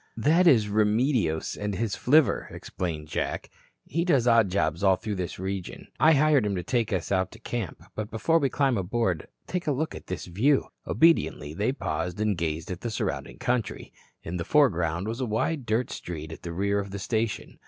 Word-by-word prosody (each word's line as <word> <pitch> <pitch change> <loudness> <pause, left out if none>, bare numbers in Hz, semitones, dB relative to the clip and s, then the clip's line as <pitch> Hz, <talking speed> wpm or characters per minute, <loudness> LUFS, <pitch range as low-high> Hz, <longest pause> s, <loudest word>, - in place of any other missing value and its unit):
"That 160 +10 +4
is 115 -9 +5
Remedios 105 - +1
and 105 -1 -3
his 110 0 -1
flivver," 150 +2 +3
explained 80 -4 -5
Jack. - - -3 0.3
"He 170 +4 -1
does 140 -9 +3
odd 115 -4 +5
jobs 85 -2 0
all 95 -1 +5
through 110 +1 -4
this 90 -3 -4
region. 95 -1 -5
I 160 +1 +6
hired 150 -3 +4
him 100 -2 -1
to 90 - -3
take 115 -1 0
us 95 -2 -2
out 95 -1 +1
to 115 - -13
camp. 115 -6 -5
But 110 -1 -4
before 160 +10 +2
we 140 -3 +1
climb 135 -6 +1
aboard, 95 -3 -1 0.2
take 180 -2 -3
a - - +3
look 155 +4 -1
at - - -10
this 90 - -4
view." 120 +11 +2 0.2
Obediently, 160 - +2
they 105 +9 0
paused 90 - -3
and 105 -1 +1
gazed 80 0 -3
at 90 0 -5
the 120 - -3
surrounding 60 - -3
country. 125 -4 -2 0.3
In 85 +2 -4
the 85 - -2
foreground 90 - +2
was 115 +4 -3
a 130 - -1
wide 130 +5 -1
dirt 115 +4 0
street 80 -2 -6
at 80 - -9
the 85 - -6
rear 100 +4 0
of 100 0 -4
the 100 - -5
station. 110 +2 -2
105 Hz, 200 wpm, -27 LUFS, 90-125 Hz, 0.3 s, I